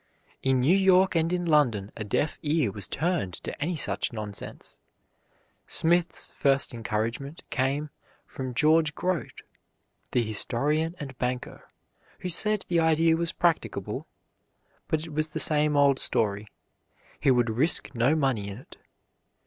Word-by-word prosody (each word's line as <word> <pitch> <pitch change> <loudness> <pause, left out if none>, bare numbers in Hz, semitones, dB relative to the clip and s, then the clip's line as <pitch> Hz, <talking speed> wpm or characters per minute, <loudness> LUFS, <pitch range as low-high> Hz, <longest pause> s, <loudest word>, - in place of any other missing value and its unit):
In 130 -1 +2
New 155 +9 +4
York 190 -1 +4
and 165 0 +1
in 180 -1 -1
London 125 -11 +2
a 110 - -4
deaf 105 +9 -1
ear 150 -7 +1
was 100 -1 -2
turned 155 - -2
to - - -8
any 170 +4 -1
such 155 - 0
nonsense. 105 -3 -8 0.9
Smith's 170 +1 +1
first 135 -2 +2
encouragement 115 +7 -4
came 140 +3 -1 0.3
from 130 -2 -6
George 155 +2 +3
Grote, 180 -8 -3 0.7
the 120 - +1
historian 145 - 0
and 135 -4 -7
banker, 125 0 -4 0.5
who 185 - -3
said 210 +4 +1
the 170 -1 +1
idea 160 0 +3
was 170 +1 +1
practicable; 170 -2 -1 0.8
but 160 0 -1
it 160 - -10
was 155 +1 -1
the 160 - -4
same 150 -1 +3
old 140 -1 +4
story, 105 -1 +1 0.7
he - - +2
would 120 -3 +3
risk 140 +9 +2
no 125 +5 +2
money 130 -9 0
in 100 - -7
it. 130 - -15
145 Hz, 140 wpm, -27 LUFS, 120-165 Hz, 0.9 s, New